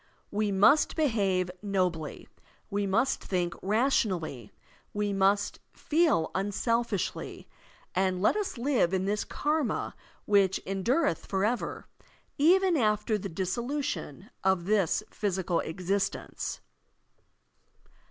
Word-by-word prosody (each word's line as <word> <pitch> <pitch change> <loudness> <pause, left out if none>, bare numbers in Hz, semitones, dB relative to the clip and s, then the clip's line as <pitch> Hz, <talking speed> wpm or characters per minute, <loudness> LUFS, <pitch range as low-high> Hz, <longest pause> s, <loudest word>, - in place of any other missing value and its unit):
We 210 0 0
must 205 +10 +4
behave 195 - +1
nobly, 180 -6 -2 0.4
we 200 0 0
must 230 +8 +1
think' 175 -2 -1
rationally, 190 - 0 0.4
we 205 -1 0
must 195 +1 +2
feel 305 - +2
tmselfishly, 205 +2 -1 0.5
and 185 0 +1
let 200 - +3
us 415 -10 -2
live 235 -8 +2
in 190 0 0
this 210 +1 0
karma 295 -5 -1 0.3
which 200 -2 +3
endureth 195 - 0
forever, 210 +5 -1 0.5
even 360 +3 +5
after 215 -2 +1
the 195 - -5
dissolution 195 - -3
of 190 -2 +2
this 205 -1 +2
physical 185 -4 -1
existence. 190 +4 -3
200 Hz, 100 wpm, -29 LUFS, 185-235 Hz, 0.5 s, even